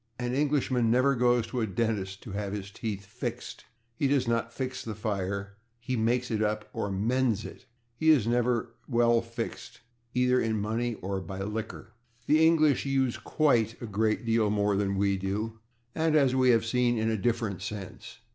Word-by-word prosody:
An 125 0 -2
Englishman 135 -4 +1
never 130 +4 +4
goes 120 -2 +2
to 120 +2 -3
a 110 - 0
dentist 100 -2 -2
to 110 - -8
have 100 0 -3
his 100 -1 -5
teeth 100 -2 -5
/fixed/. 120 0 -5 0.3
He 135 +4 0
does 135 -3 +2
not 115 0 0
/fix/ 130 +1 -4
the 110 -2 -5
fire; 100 -1 -3 0.2
he 125 +2 -3
/makes 120 +2 0
it 110 -1 0
up/, 105 0 -1
or 100 - -2
/mends/ 115 +2 0
it. 130 - -11 0.3
He 160 +6 +1
is 145 -9 +5
never 120 0 0 0.2
/well 120 -1 +3
fixed/, 115 0 -6 0.3
either 125 0 +3
in 110 -1 0
money 115 +3 -1
or 95 0 -2
by 95 +2 -6
liquor. 110 +2 -5 0.3
The 155 +3 +4
English 155 -4 +4
use 135 -3 0
/quite/ 120 -7 +1
a - - -6
great 110 +2 0
deal 115 -2 +2
more 105 -1 +1
than 100 -1 0
we 100 0 +2
do, 105 +4 -3 0.3
and, 160 -1 +1
as 135 -4 +4
we 130 -1 +3
have 115 -2 +4
seen, 120 0 +1
in 110 0 +1
a - - +1
different 110 -3 -1
sense. 100 +2 -7
115 Hz, 185 wpm, -28 LUFS, 105-125 Hz, 0.3 s, is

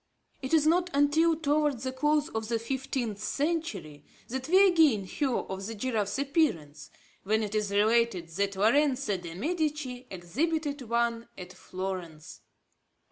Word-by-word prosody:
It 260 - -5
is 315 -2 +4
not 350 +3 +3
until 315 +4 +3
towards 295 -4 0
the 260 - -2
close 295 +3 +1
of 220 0 -4
the 230 0 0
fifteenth 245 -3 -3
century, 285 - -3 0.3
that 260 +2 -4
we 380 +4 +6
again 315 - +4
hear 270 +9 -2
of 195 -4 -3
the 225 - -5
giraffe's 215 -2 -1
appearance, 270 - -1 0.3
when 220 +2 0
it 210 -1 -4
is 210 -2 0
related 210 -3 +2
that 200 +4 -2
Lorenzo 250 +1 +2
de 170 -2 -8
Medici 295 - -2
exhibited 285 - -2
one 235 0 0
at 180 -1 -9
Florence. 180 -5 -7
245 Hz, 140 wpm, -28 LUFS, 200-295 Hz, 0.3 s, we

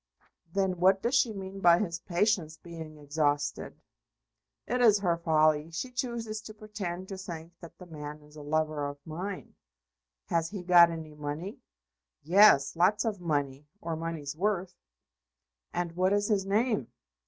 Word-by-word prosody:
"Then 190 -2 0
what 190 +2 +4
does 235 - 0
she 260 -4 +3
mean 195 -1 -7
by 170 -2 +6
his 170 -3 -2
patience 175 -4 0
being 160 -3 -10
exhausted?" 145 0 -1 0.9
"It 250 +1 -1
is 220 -4 +6
her 180 -4 +1
folly. 155 -2 +2
She 180 +10 -5
chooses 235 -4 -3
to 215 0 -11
pretend 200 -4 -6
to 195 -1 -6
think 170 -2 -8
that 170 -1 -12
the 180 - -11
man 150 -2 -8
is 150 0 -18
a 150 - -9
lover 155 0 -1
of 145 0 -7
mine." 180 +5 -6 0.7
"Has 165 -1 0
he 200 -3 -6
got 175 -1 +7
any 160 -2 -7
money?" 150 +6 -6 0.6
"Yes; 170 -5 +6
lots 200 +6 +3
of 210 -5 -2
money 145 -3 -2
or 165 -3 -4
money's 160 -3 -5
worth." 185 0 -1 1.0
"And 175 -1 -2
what 185 +3 +1
is 205 +1 +1
his 195 -3 +1
name?" 215 - +1
175 Hz, 155 wpm, -29 LUFS, 155-200 Hz, 1.0 s, got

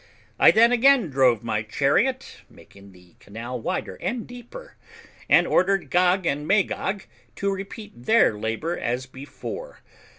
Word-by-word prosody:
I - - +8
then 230 +2 +5
again 245 - +4
drove 130 -5 +3
my 110 -2 -1
chariot, 145 - 0
making 100 0 -17
the 90 -2 -20
canal 115 +4 -7
wider 185 - -4
and 240 -2 -3
deeper, 245 - -12 0.5
and - - +5
ordered 195 +1 +1
Gog 180 +1 +2
and 150 -1 -2
Magog 195 0 0 0.3
to 200 0 -1
repeat 195 - -9
their 225 - +4
labour 115 +11 -3
as 125 +2 -2
before. 140 - -9
175 Hz, 135 wpm, -24 LUFS, -, 0.5 s, I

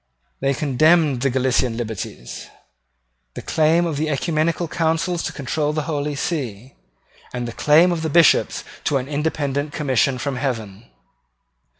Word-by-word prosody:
They 135 0 0
condemned 150 0 +3
the 135 - +2
Gallican 125 -2 +1
liberties, 110 - -6 0.9
the - - -7
claim 160 +2 +2
of 155 -4 -2
oecumenical 155 +2 0
councils 165 +2 0
to - - -3
control 150 +2 -2
the 155 -1 -1
Holy 145 -2 -2
See, 130 - -4 0.6
and 125 -1 -4
the 115 - -6
claim 160 +8 +4
of 160 -2 -2
Bishops 170 -1 +4 0.2
to 145 - +2
an 130 0 -4
independent 145 -1 -2
commission 130 -4 +1
from 130 +1 -3
heaven. 115 -6 -4
145 Hz, 130 wpm, -21 LUFS, 130-160 Hz, 0.9 s, claim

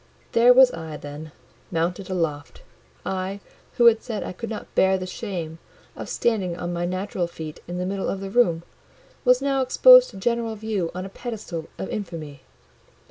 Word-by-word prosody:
There 235 +2 +6
was 255 0 +7
I, 160 -2 -7
then, 150 +2 -9 0.4
mounted 175 +3 -2
aloft; 160 -6 -3 0.4
I, 190 +1 -3 0.3
who 240 - +3
had 230 -1 +6
said 225 -4 -4
I - - -5
could 230 +5 -6
not 220 - -7
bear 190 0 +4
the 185 - -5
shame 180 -5 -5 0.4
of - - -7
standing 195 -7 0
on 175 0 -4
my 175 0 -1
natural 185 -1 -2
feet 160 -3 -8
in 175 +1 -5
the 180 - -2
middle 195 +1 -2
of 195 - -3
the 195 0 -6
room, 175 -8 +3 0.6
was 250 +1 +4
now 275 -1 +1
exposed - - +7
to - - -12
general 230 +2 -1
view 205 -5 -2
on 185 +1 -4
a - - -7
pedestal 200 -7 -6
of - - -4
infamy. 160 -9 -6
190 Hz, 180 wpm, -24 LUFS, 170-225 Hz, 0.6 s, was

